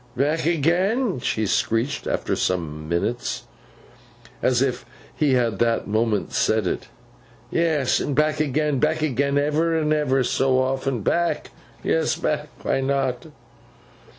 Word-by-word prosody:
'Back 150 +4 +1
agen?' 180 - +1
she 110 -2 -1
screeched, 115 +6 0
after - - -1
some 80 -4 -2
minutes, 105 +8 -1 1.0
as 130 0 +3
if 130 -2 -1 0.3
he 150 -4 +2
had 115 -5 +1
that 115 -1 +1
moment 110 0 0
said 110 -2 +2
it. - - -2 0.6
'Yes! 160 -6 +2
And 145 - -2
back 155 +1 +2
agen. 150 -1 0
Back 155 +2 +1
agen 140 0 +1
ever 155 +3 +1
and 155 -1 +1
ever 135 -3 +2
so 130 +1 +2
often. 130 -1 0
Back? 170 - 0 0.3
Yes, 80 - +1
back. - - -1 0.2
Why 135 - +1
not? 135 0 -1
135 Hz, 130 wpm, -23 LUFS, 120-155 Hz, 1.0 s, as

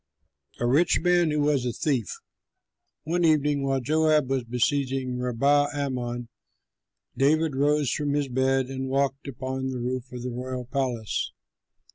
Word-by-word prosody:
A 120 - 0
RICH 155 +8 +3
MAN 175 -1 +3
WHO 150 0 0
WAS 145 -3 +2
A 125 - -1
THIEF 130 - -1 0.9
One 175 +2 0
evening, 150 -3 +3
while 135 -1 0
Joab 155 0 +2
was 135 -2 +1
besieging 130 +1 -1
Rabbath 140 +4 +2
Ammon, 120 -4 -3 0.9
David 155 +1 +2
rose 145 -1 +2
from 145 -1 -1
his 145 -1 0
bed 130 +1 +1
and 130 0 -5
walked 135 +1 0
upon 130 0 -4
the 130 - -3
roof 125 +1 -3
of 125 -1 -7
the 125 - -3
royal 125 +1 -5
palace. 125 -4 -2
135 Hz, 145 wpm, -26 LUFS, 125-145 Hz, 0.9 s, RICH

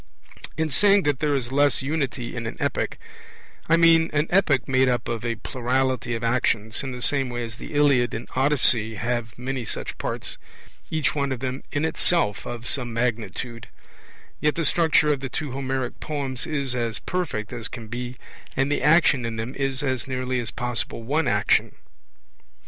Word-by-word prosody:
In 160 -1 0
saying 200 +6 +5
that 145 -3 +1
there 150 -2 +1
is 130 -2 -2
less 145 0 +3
unity 135 -5 -2
in 115 -1 -3
an - - -6
epic, - - -1 0.7
I 165 - +6
mean 165 -1 +6
an 150 +1 +2
epic 160 -9 +3
made 130 -1 +4
up 120 -1 0
of 115 -1 -3
a 120 -1 -1
plurality 130 +1 -1
of 115 - -5
actions, 115 -2 +1
in 135 - -4
the 125 -1 -4
same 135 -3 +2
way 120 0 -3
as 115 -1 -7
the 145 - -8
Iliad 140 -5 +4
and 110 - -5
Odyssey 130 -5 +3
have 115 +2 -2
many 130 0 -3
such 110 - -5
parts, - - -4 0.5
each 155 -2 +1
one 140 -2 -1
of 130 - -2
them 130 +1 -3
in 145 +2 0
itself 160 - +1
of 120 0 -6
some 125 -4 -1
magnitude; 115 0 -2 0.7
yet 150 0 +2
the 165 - 0
structure 150 -2 +4
of 140 - -3
the 135 0 -4
two 150 +2 -3
Homeric 130 -1 -3
poems 140 -2 -3
is 140 -5 -1
as 115 -3 -1
perfect 130 - -3
as 120 -1 -3
can 120 -4 -8
be, 120 +2 -5 0.4
and 135 +2 +2
the - - +1
action 150 -4 +5
in 115 -1 -3
them 115 +3 -4
is 135 0 -2
as 130 -2 -1
nearly 130 -1 -1
as 115 -2 -3
possible 120 -2 -3
one 150 +7 +1
action. - - +2
130 Hz, 185 wpm, -24 LUFS, 120-145 Hz, 0.7 s, I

